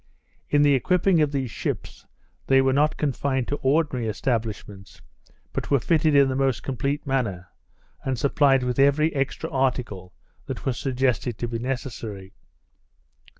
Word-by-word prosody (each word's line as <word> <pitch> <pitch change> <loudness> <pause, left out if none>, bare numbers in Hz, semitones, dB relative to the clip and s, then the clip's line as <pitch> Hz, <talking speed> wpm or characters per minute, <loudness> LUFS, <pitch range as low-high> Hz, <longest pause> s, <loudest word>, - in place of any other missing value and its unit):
In 145 0 +4
the 145 -1 +5
equipping 180 +5 +2
of 150 -2 +2
these 135 -5 -2
ships, - - -5 0.4
they 135 0 +5
were 135 0 +3
not 150 +3 +2
confined 135 -3 -1
to 145 - -1
ordinary 135 -4 +1
establishments, 105 -4 -4 0.5
but - - -3
were 140 - +4
fitted 155 +2 +2
in 140 -1 +6
the 130 - -1
most 135 -3 0
complete 140 +3 -2
manner, 105 -10 -2 0.5
and 130 -1 -1
supplied 135 0 +3
with 125 +1 -2
every 145 +3 +3
extra 140 +3 -2
article 125 - -2 0.3
that - - -6
was 130 -2 -1
suggested 125 -4 0
to 120 - -3
be 115 -1 -4
necessary. 115 -6 -5
135 Hz, 150 wpm, -24 LUFS, 120-140 Hz, 0.5 s, in